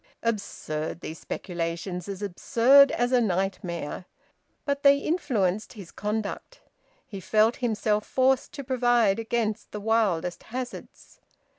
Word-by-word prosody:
Absurd, 170 -8 -3
these 160 - -7
speculations; 175 +1 -4
as 200 +1 -5
absurd 245 +8 +5
as 245 +1 0
a 250 -1 +4
nightmare! 180 -4 -2 0.6
But 280 -1 -1
they 280 0 +6
influenced 230 - -1
his 195 -6 -11
conduct. 215 - -4 0.5
He 200 - -8
felt 215 +5 +2
himself 215 -3 0
forced 260 0 +2
to 280 - -6
provide 240 -5 +2
against 225 -1 -2
the 210 - -5
wildest 200 -6 0
hazards. 250 +2 -8
215 Hz, 120 wpm, -26 LUFS, 190-245 Hz, 0.6 s, they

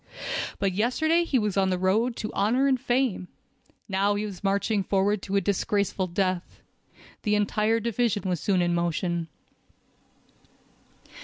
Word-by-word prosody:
But 195 -1 0
yesterday 315 - +2
he 280 - +1
was 210 -4 0
on 190 -1 +3
the 185 - 0
road 215 +7 +1
to 215 - -5
honor 230 +7 +2
and 260 -3 +2
fame; 245 -7 0 0.6
now 200 0 +1
he 205 +1 -2
was 200 -3 -8
marching 200 +1 +1
forward 195 +1 +1
to 195 - -4
a 200 - +3
disgraceful 200 0 0
death. 185 0 -2 0.6
The 210 0 +1
entire 210 +2 +1
division 230 -2 0
was 180 -3 -1
soon 185 +2 +1
in 175 0 +1
motion. 170 0 -1
200 Hz, 145 wpm, -26 LUFS, 185-225 Hz, 0.6 s, on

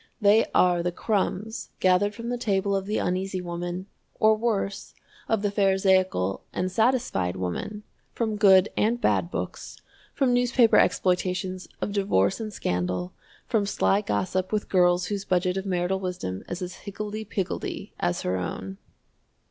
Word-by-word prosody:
They 210 +1 +5
are 175 -1 +4
the 175 +1 -1
crumbs 210 +2 -2
gathered 190 +3 +3
from 230 0 -6
the 245 - -1
table 200 -3 +1
of 195 0 -2
the 210 - 0
Uneasy 185 +1 -1
Woman, 175 +1 -4 0.3
or 215 0 +5
worse, 215 -3 -2 0.3
of 220 -2 +1
the 205 - +1
pharisaical 190 - +2
and 185 +1 -2
satisfied 220 - +1
woman, 95 - -4 0.3
from 220 -2 -2
good 195 -1 +6
and 230 +3 +1
bad - - +1
books, - - -5 0.4
from 260 -3 +2
newspaper 245 -1 +4
exploitations 185 0 +1
of - - -2
divorce 195 - +1
and 220 -1 -4
scandal, 90 - -2 0.3
from 210 -3 0
sly 200 0 +2
gossip 185 -2 -1
with 215 -1 -1
girls 180 -1 +3
whose 200 -1 -3
budget 180 -1 +1
of 195 +1 -3
marital 180 +1 0
wisdom 180 - -4
is 175 +1 -4
as 180 0 -6
higgledy 210 +1 -6
piggledy 195 -3 -4
as 90 - 0
her 90 +1 0
own. 95 +1 -5
190 Hz, 150 wpm, -26 LUFS, 180-210 Hz, 0.4 s, good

